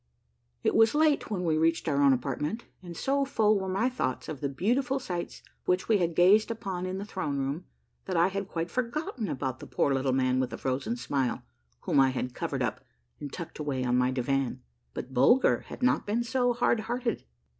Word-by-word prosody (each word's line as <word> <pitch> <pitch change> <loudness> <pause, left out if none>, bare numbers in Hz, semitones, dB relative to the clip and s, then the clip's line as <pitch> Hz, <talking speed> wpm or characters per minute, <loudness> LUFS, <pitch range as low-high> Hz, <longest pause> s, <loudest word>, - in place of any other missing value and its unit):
It - - +2
was 225 +3 +5
late 305 -1 +3
when 185 -4 -2
we 155 -2 +2
reached 165 +1 +1
our 140 -2 +2
own 140 -1 +6
apartment, 140 - -1 0.2
and 175 -2 -9
so 275 +1 +1
full 215 -6 +2
were 190 - -4
my 195 +6 +1
thoughts 245 - -2
of 145 -4 -6
the 140 - -1
beautiful 245 - 0
sights 175 -9 -5 0.2
which 180 0 +1
we 215 -3 +4
had 170 -2 0
gazed 205 +6 +5
upon 190 -5 -4
in 185 +1 -3
the 200 - -5
throne 185 -9 -3
room, 140 +6 -2 0.4
that 185 -2 -2
I 170 +3 +4
had 195 0 -3
quite 170 -2 -3
forgotten 250 -2 -2
about 130 -1 -3
the - - -9
poor 140 - +1
Little 135 0 +1
Man 130 0 +2
with 130 -1 0
the - - -6
Frozen 135 - -2
Smile 135 - -1 0.4
whom - - +2
I 135 -1 +6
had 125 -1 -3
covered - - -2
up - - -3 0.4
and 145 - -6
tucked 170 -3 -7
away 140 -4 -2
on 125 -1 +1
my 125 0 +3
divan; 130 0 -1 0.3
but 130 - -6
Bulger 240 - +4
had - - -8
not 250 - +2
been 225 +3 +1
so 245 +1 +1
hard 240 -1 +2
hearted. 235 +1 -2
180 Hz, 210 wpm, -28 LUFS, 135-225 Hz, 0.4 s, own